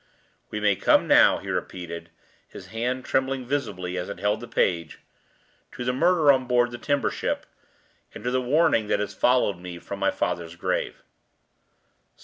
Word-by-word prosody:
"We 105 - -4
may 105 -1 +3
come - - +3
now," - - +6
he - - -6
repeated, 85 -2 -5 0.4
his - - -12
hand 125 +3 -2
trembling 130 -1 0
visibly 95 -10 -3
as 90 - -5
it 100 - -6
held 105 +1 0
the 120 - -8
page, 85 -7 0 0.8
"to 125 - -6
the 125 - +1
murder 160 +1 +4
on 130 -2 +1
board 120 0 +2
the 120 - -7
timber 145 -1 0
ship, - - -3 0.7
and - - -9
to 125 - -1
the 130 0 +1
warning 125 -4 +2
that - - +1
has 105 - -3
followed 125 -7 +2
me 90 -1 -8
from 100 +3 -7
my 100 - +2
father's 85 -1 -3
grave." 90 - -3
120 Hz, 170 wpm, -25 LUFS, 90-130 Hz, 0.8 s, now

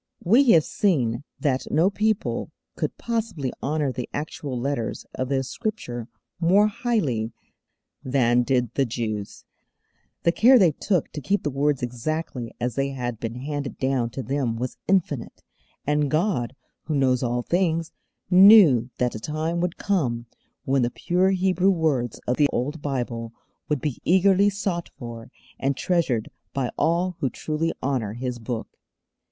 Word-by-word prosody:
We 240 +8 +5
have 160 -2 +6
seen 130 - 0 0.2
that 135 -4 0
no 170 +6 +3
people 215 +1 0 0.3
could - - -3
possibly 220 - -2
honour 145 -1 0
the 125 -1 -5
actual 145 -3 -4
letters 130 -3 -2
of 130 0 -3
the 135 -1 +1
Scripture 130 - -4 0.3
more 185 +5 +5
highly 185 - -1 0.7
than 125 -2 +3
did 125 -2 0
the 135 -2 +1
Jews. 110 -3 -4 0.8
The 170 - +4
care 250 +8 +6
they 185 -8 +5
took 175 +2 -1
to 150 - -6
keep 200 +7 0
the 145 - -1
words 140 0 0
exactly 125 0 -3
as 120 0 -1
they 135 +3 0
had 120 -4 -4
been 115 0 -4
handed 145 +2 -4
down 130 -3 0
to 130 +2 -5
them 135 -4 -1
was 125 +2 -4
infinite; 165 -10 0 0.4
and 150 0 +1
God, 155 - 0 0.3
who 155 - -1
knows 130 -3 +2
all 120 -1 -1
things, 165 -1 0 0.4
knew 180 - +8
that 125 -1 0
a 110 - -5
time 155 +7 -2
would 180 -1 -2
come 125 - 0 0.4
when 135 0 +2
the 120 - +2
pure 180 +8 +1
Hebrew 190 0 +2
words 150 - 0
of 125 - 0
the 145 - +5
old 145 +5 -2
Bible 120 -5 -3 0.4
would 150 -4 0
be 150 -5 -3
eagerly 190 +2 +4
sought 195 -4 -3
for, 115 -2 -8 0.3
and 135 0 0
treasured 155 -11 0 0.2
by 130 -3 -1
all 175 +1 +1
who 135 - 0
truly 155 +6 -2
honour 125 -6 -1
His 125 +1 -4
Book. 115 0 -6
140 Hz, 155 wpm, -24 LUFS, 125-175 Hz, 0.8 s, knew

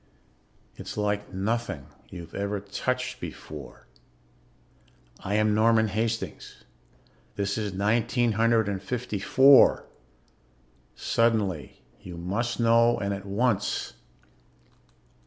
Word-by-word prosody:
It's - - -8
like 105 0 -1
nothing 100 - -2 0.2
you've 85 -2 -10
ever 100 +1 -2
touched 125 +6 -3
before. 75 -4 -9 1.3
I 100 - -3
am 105 0 +2
Norman 110 0 +3
Hastings. 115 +2 -4 0.7
This 100 0 -1
is 105 -2 -2
nineteen 115 +4 +1
hundred 115 0 +2
and 100 -2 -3
fifty 115 0 -4
four. 135 +6 +6 1.1
Suddenly 105 - 0 0.2
you 90 -2 -9
must 100 +9 -2
know, 115 0 +4
and 100 -2 -2
at 100 0 -7
once. 100 0 0
105 Hz, 100 wpm, -26 LUFS, 100-115 Hz, 1.3 s, four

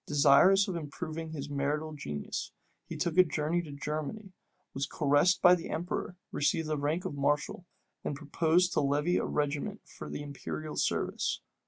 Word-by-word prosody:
Desirous 150 +7 +6
of 185 - -3
improving 160 +1 -5
his 145 -3 -5
martial 145 +2 -2
genius, 75 - -5 0.4
he - - -6
took 170 +1 0
a - - +10
journey 155 +2 -1
to 160 -4 -9
Germany, 155 +8 -4 0.4
was 135 +1 -2
caressed 150 +5 +3
by 180 - +9
the 175 -2 -1
emperor, 180 +1 -3
received 150 +2 +1
the 155 - 0
rank 155 +5 -1
of - - -3
mareschal, 145 +5 0 0.4
and 145 - -2
proposed 165 +4 +2
to - - +2
levy 145 +5 +2
a - - 0
regiment 150 +8 -2
for - - -10
the 145 - -5
imperial 150 +2 -6
service. - - -1
155 Hz, 165 wpm, -30 LUFS, 145-175 Hz, 0.4 s, a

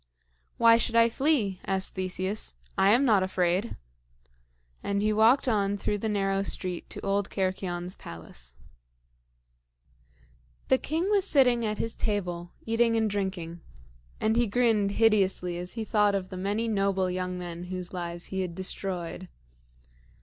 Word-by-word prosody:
"Why 230 0 +6
should 230 0 -1
I 230 0 +6
flee?" 230 -8 +1
asked 190 0 -2
Theseus. 185 - -3 0.2
"I 195 - +4
am 245 +6 +5
not 215 -6 +4
afraid;" 185 +3 0 1.0
and 200 0 -1
he 215 +1 +1
walked 230 +6 +4
on 205 -3 +1
through 205 +1 -2
the 220 - -2
narrow 195 -1 0
street 185 -2 -3
to - - -7
old 200 0 0
Cercyon's 185 -2 -3
palace. 65 -7 -11 2.1
The 260 - +4
king 330 +7 -1
was 400 -2 +3
sitting 250 -6 +4
at 210 0 -2
his 230 - -2
table, 175 -5 -2 0.2
eating 230 0 +2
and 220 -2 +1
drinking; 185 -4 -3 0.6
and 220 +1 +1
he 240 -1 +3
grinned 215 -3 +2
hideously 195 -5 +2
as 180 0 -6
he 225 -1 -4
thought 210 -2 +3
of 185 -1 -3
the 185 - -7
many 205 +5 -1
noble 195 -3 +1
young 180 0 -3
men 175 -1 -6
whose 180 0 -5
lives 175 -1 -4
he 190 - 0
had 180 -2 -4
destroyed. 185 -1 -4
195 Hz, 150 wpm, -28 LUFS, 185-225 Hz, 2.1 s, Why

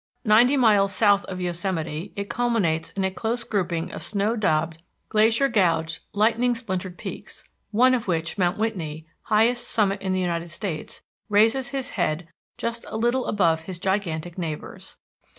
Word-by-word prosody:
Ninety 240 +6 +5
miles 205 -5 +4
south 205 -2 +4
of 185 -1 -6
Yosemite 175 -1 -3
it 200 0 -4
culminates 210 -11 0
in 195 - -2
a 190 - +1
close 230 +5 -2
grouping 180 -5 -2
of - - -7
snow 210 +2 0
daubed, 165 -6 0 0.3
glacier 225 +5 +4
gouged, 165 -8 +1
lightning 235 +4 +2
splintered 185 -6 -4
peaks, - - -8 0.2
one 250 +4 +4
of 240 -5 -1
which, 165 -2 -1
Mount 180 -1 +1
Whitney, 165 -8 -3 0.2
highest 235 +3 +2
summit 200 -2 +1
in 190 -1 -2
the 185 - +1
United 170 -2 -2
States, 170 -1 -5 0.3
raises 225 +6 +3
his 270 -2 -3
head 170 -4 -1 0.3
just 230 0 -3
a - - -4
little 240 +3 +1
above 165 -5 +2
his 185 -1 -6
gigantic 175 -3 -2
neighbors. 160 -3 -6
195 Hz, 155 wpm, -24 LUFS, 170-225 Hz, 0.3 s, Ninety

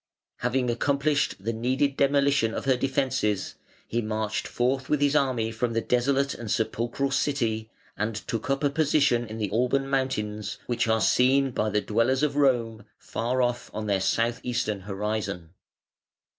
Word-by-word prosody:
Having 125 0 0
accomplished 140 +4 +1
the 110 +4 -3
needed 130 +5 0
demolition 140 -5 +2
of - - -4
her 135 -1 +4
defences, 130 -6 0 0.3
he 120 - -1
marched 110 -1 -2
forth 130 +2 -1
with 150 - +2
his 145 0 +2
army 125 -6 +1
from 115 +1 -2
the 115 - +1
desolate 135 +4 +1
and 115 -2 -7
sepulchral 120 +5 -1
City 120 -6 0 0.3
and 110 +1 -2
took 110 +3 -4
up 135 +1 0
a 145 - +2
position 140 -5 +2
in 110 +1 -7
the 105 -3 -2
Alban 125 +5 +1
Mountains, 110 -6 -2
which 120 -1 0
are 110 0 +2
seen 135 +3 +3
by 110 -2 0
the 105 0 +1
dwellers 115 +7 +1
in 150 -2 +2
Rome 120 -6 +1
far 125 +3 -1
off 120 0 -2
on 110 0 -3
their 100 -2 +1
south 115 +4 +1
eastern 120 -4 -1
horizon. 100 -3 -4
120 Hz, 160 wpm, -26 LUFS, 110-135 Hz, 0.3 s, her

